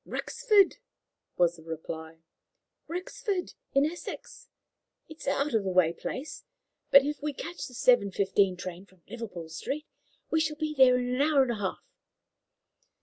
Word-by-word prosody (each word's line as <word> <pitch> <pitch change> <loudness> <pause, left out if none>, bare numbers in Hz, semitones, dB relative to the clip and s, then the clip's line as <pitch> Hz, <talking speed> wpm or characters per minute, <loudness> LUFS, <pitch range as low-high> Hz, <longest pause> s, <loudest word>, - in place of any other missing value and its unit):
"Rexford," 425 -6 +2 0.6
was 175 -1 +3
the 160 - -14
reply 160 0 -7 0.6
"Rexford, 365 +3 -3 0.2
in 275 +1 +4
Essex. 335 +3 -7 0.6
It 315 -1 -12
is - - -9
an 275 - +3
out 285 0 -1
of 220 -3 +2
the 190 - -1
way 180 -3 +3
place, 265 - -6 0.5
but 275 0 +8
if 295 0 -3
we 295 0 -2
catch 340 +5 -6
the 250 - -12
seven 240 -4 +4
fifteen 195 -1 +2
train 185 +1 -7
from 185 -3 -25
Liverpool 210 -8 -7
Street, 275 - -4 0.5
we 320 - +3
shall 310 -1 -1
be 310 -1 -2
there 260 -3 +6
in 250 0 -1
an 255 - +1
hour 290 -2 +5
and 250 - -1
a - - -1
half." 195 -2 -3
250 Hz, 165 wpm, -29 LUFS, 185-305 Hz, 0.6 s, but